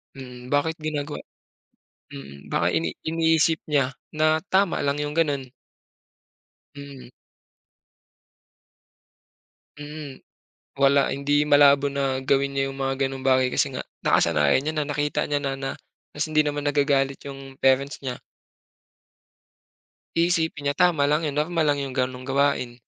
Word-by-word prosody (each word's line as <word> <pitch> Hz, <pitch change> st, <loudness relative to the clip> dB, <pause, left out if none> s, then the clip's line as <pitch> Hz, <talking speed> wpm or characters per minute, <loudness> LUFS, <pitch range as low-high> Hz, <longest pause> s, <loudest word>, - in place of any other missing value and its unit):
Mm. 125 Hz, -2 st, -10 dB
Bakit 145 Hz, +4 st, 0 dB
ginagawa 150 Hz, -1 st, -4 dB, 0.9 s
mm. 70 Hz, 0 st, -11 dB
Baka 85 Hz, -, +1 dB
ini 80 Hz, 0 st, 0 dB, 0.2 s
iniisip 160 Hz, 0 st, +2 dB
niya 140 Hz, -3 st, +1 dB, 0.2 s
na 155 Hz, +1 st, +1 dB
tama 190 Hz, -1 st, +2 dB
lang 140 Hz, 0 st, 0 dB
yung 145 Hz, 0 st, -3 dB
ganun. 145 Hz, -4 st, 0 dB, 1.3 s
Mm. 140 Hz, -3 st, -10 dB, 2.7 s
Mm. 145 Hz, -1 st, -9 dB, 0.5 s
Wala, 140 Hz, 0 st, +3 dB
hindi 145 Hz, +2 st, +1 dB
malabo 145 Hz, -1 st, +5 dB
na 135 Hz, -1 st, -1 dB
gawin 140 Hz, +1 st, +1 dB
niya 135 Hz, -, +2 dB
yung 135 Hz, -, -10 dB
mga 135 Hz, 0 st, 0 dB
gano'ng 135 Hz, 0 st, -4 dB
bagay 130 Hz, -1 st, +2 dB
kasi -, -, 0 dB
nga -, -, -4 dB, 0.2 s
nakasanayan 75 Hz, -, +3 dB
niya, 155 Hz, -, -1 dB, 0.2 s
nakita 150 Hz, 0 st, -1 dB
niya 145 Hz, -, 0 dB
na 135 Hz, -1 st, -3 dB, 0.4 s
ta's 150 Hz, -, -2 dB
hindi 155 Hz, -, +4 dB
naman 145 Hz, -1 st, -1 dB
nagagalit 140 Hz, -2 st, +1 dB
yung 135 Hz, -1 st, -10 dB
parents 135 Hz, +2 st, +2 dB
niya. 130 Hz, -3 st, -4 dB, 2.0 s
Iisipin 165 Hz, -3 st, +1 dB
niya -, -, -8 dB
tama 175 Hz, -5 st, +4 dB
lang 155 Hz, +1 st, +1 dB
yun, 145 Hz, -, -4 dB
normal 160 Hz, +2 st, 0 dB
lang 145 Hz, -1 st, +2 dB
yung 135 Hz, -, -5 dB
gano'ng 130 Hz, 0 st, -2 dB
gawain. 135 Hz, -2 st, 0 dB
140 Hz, 130 wpm, -24 LUFS, 135-150 Hz, 2.7 s, malabo